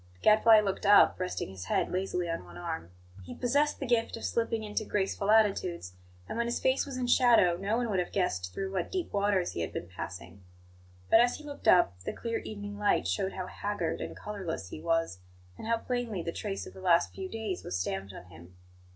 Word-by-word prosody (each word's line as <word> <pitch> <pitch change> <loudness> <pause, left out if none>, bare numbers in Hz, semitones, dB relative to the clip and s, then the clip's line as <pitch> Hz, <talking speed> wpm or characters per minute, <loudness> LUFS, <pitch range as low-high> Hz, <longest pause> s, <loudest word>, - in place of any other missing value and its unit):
The - - -26
Gadfly 215 0 +7
looked 200 0 -2
up, 205 -2 +6
resting 185 - -3
his 95 -1 -8
head - - 0
lazily 180 -1 -1
on 165 - -3
one 85 -1 -12
arm. 85 -1 -5 0.3
He - - -9
possessed 285 +4 +1
the 275 - -3
gift 235 -2 +1
of - - -6
slipping 230 -1 -1
into 210 +1 -2
graceful 200 -1 -1
attitudes; 195 - +2 0.3
and - - -4
when 235 - +1
his 235 - -1
face 260 +2 +1
was 270 -2 -5
in 255 - -1
shadow 240 -8 +5
no 200 +5 -1
one 245 -1 0
would 190 - +1
have 175 - -2
guessed 90 - -1
through 195 - -4
what 180 -3 -2
deep 365 -3 -3
waters 200 -3 +1
he - - -4
had 80 - -3
been 85 - -5
passing. 95 +1 -8 0.7
But, - - +8
as 245 0 +2
he 305 - -10
looked 290 -1 -8
up, 135 - +5
the 90 - -5
clear 230 -1 -3
evening 205 -1 -7
light 205 - +2
showed 95 - -1
how 185 - -4
haggard 200 -3 -3
and - - -6
colourless 185 - -5
he 155 - -8
was, 165 - 0 0.4
and - - -8
how 230 0 +2
plainly 230 -6 -3
the 170 - -3
trace 195 +2 -4
of - - -11
the 190 - -11
last 175 -2 +3
few 380 -1 -6
days 220 - -4
was - - -3
stamped 95 +1 -3
on 90 - -10
him. 85 +1 -15
195 Hz, 220 wpm, -30 LUFS, 165-225 Hz, 0.7 s, But